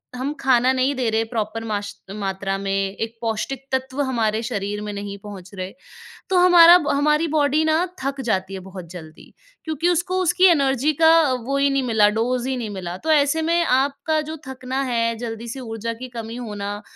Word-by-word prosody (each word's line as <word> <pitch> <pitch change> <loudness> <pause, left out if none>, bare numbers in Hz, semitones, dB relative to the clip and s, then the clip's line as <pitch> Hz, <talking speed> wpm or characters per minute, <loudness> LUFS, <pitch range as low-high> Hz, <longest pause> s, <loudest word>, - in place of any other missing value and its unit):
हम 260 +3 -2
खाना 255 -1 +3
नहीं 260 +2 +1
दे 250 -3 0
रहे, 220 +1 +1
प्रॉपर 225 -1 -4
माश 205 -2 -4 0.2
मात्रा 195 -1 -3
में, 195 0 -1
एक 225 +1 -4
पौष्टिक 235 +4 -3
तत्व 265 +1 -2
हमारे 225 -5 0
शरीर 205 -1 -3
में 210 0 -5
नहीं 200 0 -6
पहुँच 195 -3 -10
रहे, 185 +1 -6 0.6
तो 380 - +2
हमारा 350 -1 +8
ब 305 -4 -2
हमारी 300 +3 +2
बॉडी 295 0 +3
ना 315 +3 +2 0.2
थक 275 0 -2
जाती 195 -5 -1
है 190 - -5
बहुत 185 -2 -10
जल्दी, 160 -3 -12 0.3
क्योंकि 315 +1 -1
उसको 355 +2 0
उसकी 360 +1 +2
एनर्जी 280 -4 +3
का 320 - +8 0.2
वही 275 +3 0
नहीं 275 0 +1
मिला 220 -4 +3
डोज़ 250 +2 0
ही 265 - -1
नहीं 230 -4 -4
मिला। 180 -3 -5
तो 320 - 0
ऐसे 295 +1 +3
में 335 +2 +2
आपका 280 +3 +1
जो 315 - -5
थकना 260 +1 -3
है, 230 -3 0
जल्दी 230 0 -6
से 265 +4 -6
ऊर्जा 225 -1 -4
की 255 - -5
कमी 230 -1 -7
होना, 205 -3 -5
245 Hz, 190 wpm, -22 LUFS, 210-280 Hz, 0.6 s, हमारा